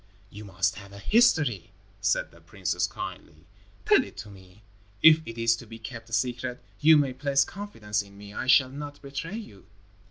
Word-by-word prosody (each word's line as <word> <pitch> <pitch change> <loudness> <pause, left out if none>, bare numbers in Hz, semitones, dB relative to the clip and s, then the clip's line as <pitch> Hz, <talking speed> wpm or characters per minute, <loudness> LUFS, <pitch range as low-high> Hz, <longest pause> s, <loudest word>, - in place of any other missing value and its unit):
"You 105 +1 -10
must 95 -2 -1
have 100 -1 -11
a - - -10
history," 150 - +3 0.3
said 100 +1 +1
the 85 - -19
princess, 90 0 -2
kindly. 75 +1 -8 0.4
"Tell - - +5
it - - -13
to 105 - -8
me. 95 +1 -17 0.4
If 160 0 +8
it 115 - -7
is 115 0 +3
to 120 - -12
be 115 +1 -10
kept 115 0 -9
a - - -11
secret, 125 +1 -1 0.2
you 155 +1 +7
may 140 -3 +1
place 140 +1 +2
confidence 110 - -4
in 100 0 -15
me. 100 0 -11
I 125 - -4
shall 130 -1 +6
not 145 +1 -8
betray 140 +8 -5
you." 105 - -11
115 Hz, 190 wpm, -27 LUFS, 100-140 Hz, 0.4 s, If